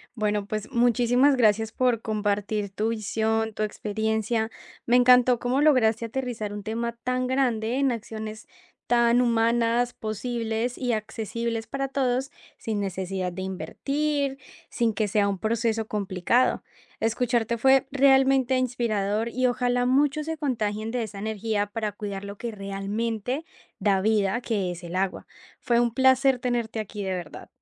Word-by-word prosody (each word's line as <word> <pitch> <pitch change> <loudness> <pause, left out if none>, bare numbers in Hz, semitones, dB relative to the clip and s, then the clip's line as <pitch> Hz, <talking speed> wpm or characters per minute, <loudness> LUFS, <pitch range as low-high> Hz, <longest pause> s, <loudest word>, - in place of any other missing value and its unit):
Bueno, 210 -2 0
pues, 215 +4 -4
muchísimas 245 +3 +3
gracias 220 -2 +3
por 245 -2 +1
compartir 210 -1 -1
tu 210 +4 -1
visión, 220 0 -1
tu 215 - -5
experiencia. 220 +1 -1 0.4
Me 240 - +4
encantó 250 0 +6
cómo 250 +4 0
lograste 235 -7 +3
aterrizar 230 -3 -4
un 205 0 -6
tema 235 +2 -2
tan 255 0 0
grande 245 -3 0
en 275 -1 +2
acciones 220 -1 -6 0.4
tan 235 0 +4
humanas, 235 0 +2
posibles 225 +2 -3
y 245 -2 -1
accesibles 225 +1 -3
para 275 +3 -3
todos, 260 -1 0 0.3
sin 220 -2 -3
necesidad 190 -1 -3
de 190 - -6
invertir, 275 - -2 0.3
sin 230 -2 0
que 210 +1 0
sea 200 0 +2
un 200 -1 -1
proceso 225 0 0
complicado. 205 +4 +1 0.4
Escucharte 235 0 0
fue 265 +3 +4
realmente 270 -1 +4
inspirador 225 -4 0
y 255 +2 -1
ojalá 245 0 +1
muchos 290 +4 +2
se 320 0 -3
contagien 220 -7 -2
de 245 -1 -1
esa 210 -2 -7
energía 215 0 -1
para 210 +1 -3
cuidar 200 -1 -6
lo 200 0 -7
que 235 +2 -4
realmente 210 +6 -3 0.4
da 200 -2 +2
vida, 210 0 +2
que 205 -7 -1
es 175 +1 -8
el 170 +1 -6
agua. 190 0 -2 0.3
Fue 235 -2 +2
un 235 -1 0
placer 260 0 +4
tenerte 240 -3 -2
aquí 210 -1 -5
de 190 - -2
verdad. 175 -4 -6
225 Hz, 150 wpm, -26 LUFS, 210-250 Hz, 0.4 s, encantó